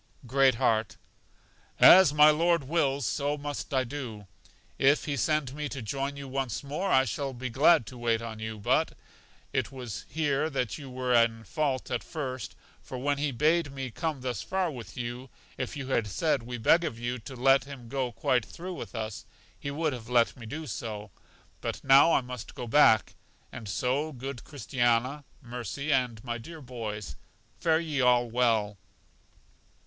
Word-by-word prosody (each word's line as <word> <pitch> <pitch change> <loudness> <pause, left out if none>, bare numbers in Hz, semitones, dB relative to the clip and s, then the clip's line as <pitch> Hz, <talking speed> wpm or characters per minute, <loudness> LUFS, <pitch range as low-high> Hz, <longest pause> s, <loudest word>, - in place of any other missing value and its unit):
Great 130 +1 +4
heart: 110 -2 +1 0.8
As 185 -5 +9
my 150 +1 +7
Lord 170 +1 +2
wills, 140 -3 0
so 145 +5 -1
must 145 0 -5
I 130 -2 +2
do; 120 -6 -6 0.5
if 140 +2 +4
He 145 - -1
send 140 +1 0
me 150 0 -4
to 130 - -5
join 140 +5 -3
you 140 -1 -7
once 135 -2 -3
more, 150 +8 -2
I 130 - +5
shall 140 -1 -3
be 125 0 -5
glad 145 +2 +5
to 125 +1 -10
wait 115 -1 +1
on 115 -1 -7
you. 110 0 -5
But 100 - +1 0.6
it - - 0
was 125 -6 -7
here 150 +1 0
that 130 -2 -2
you 140 -2 -9
were 125 0 -1
in 115 -1 +3
fault 130 +5 -2
at 120 - -1
first, 130 - -5 0.3
for 130 - -7
when 140 +2 0
He 145 0 0
bade 155 +4 +2
me 135 -2 -5
come 155 0 -3
thus 125 -5 -3
far 185 -3 -1
with 120 -5 -9
you, 120 +2 -5 0.3
if 130 +3 -4
you 135 -2 -5
had 115 -5 +1
said, 145 - 0
We 120 +1 -6
beg 165 +9 +4
of 150 -9 -3
you 120 +1 -3
to 130 +4 -9
let 135 +2 +4
him 135 -4 -10
go 130 0 -2
quite 125 0 +1
through 175 - -7
with 170 - -8
us, 110 -2 -5 0.3
He 140 - -4
would 150 +1 -1
have 120 -2 -8
let 120 -2 +3
me 115 -3 -10
do 155 +7 -5
so. 105 -7 -6 0.5
But - - -4
now 135 +5 +7
I - - +4
must 125 -2 -8
go 125 - -5
back; 115 -2 +5 0.4
and 110 -4 -8
so 130 - 0
good 130 -1 -7
Christiana, 130 +1 0 0.2
Mercy 125 +5 -3
and 125 -4 0
my 120 -1 -3
dear 160 +8 -10
boys, 110 - -6 0.4
fare 160 -1 +3
ye 155 -5 -1
all 125 -1 +4
well. 110 -4 +1
130 Hz, 180 wpm, -28 LUFS, 120-145 Hz, 0.8 s, As